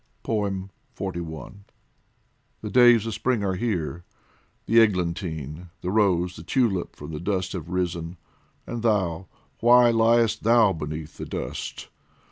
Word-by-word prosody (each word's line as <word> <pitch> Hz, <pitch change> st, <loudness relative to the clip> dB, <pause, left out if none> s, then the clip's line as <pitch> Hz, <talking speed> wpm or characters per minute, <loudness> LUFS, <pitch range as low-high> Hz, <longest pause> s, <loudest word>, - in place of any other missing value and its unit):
XLI 100 Hz, -3 st, -2 dB, 0.2 s
THE 95 Hz, -, -10 dB
days 120 Hz, -3 st, +6 dB
of 115 Hz, -, -3 dB
Spring 120 Hz, -1 st, 0 dB
are 95 Hz, -1 st, 0 dB
here! 90 Hz, -5 st, -2 dB, 0.6 s
the 115 Hz, -, +5 dB
eglantine, 85 Hz, -5 st, -1 dB
The 90 Hz, -, -2 dB
rose, 90 Hz, -4 st, +2 dB
the -, -, -8 dB
tulip 95 Hz, -1 st, 0 dB
from 75 Hz, +2 st, -9 dB
the 75 Hz, -, -5 dB
dust 95 Hz, 0 st, -2 dB
have 85 Hz, -3 st, -6 dB
risen 85 Hz, -1 st, -3 dB, 0.5 s
And 120 Hz, -1 st, -5 dB
thou, 95 Hz, -6 st, 0 dB, 0.3 s
why 120 Hz, 0 st, +6 dB
liest 115 Hz, -1 st, +3 dB
thou 115 Hz, -3 st, +4 dB
beneath 75 Hz, 0 st, -6 dB
the -, -, -6 dB
dust -, -, -5 dB
95 Hz, 125 wpm, -25 LUFS, 85-115 Hz, 0.6 s, days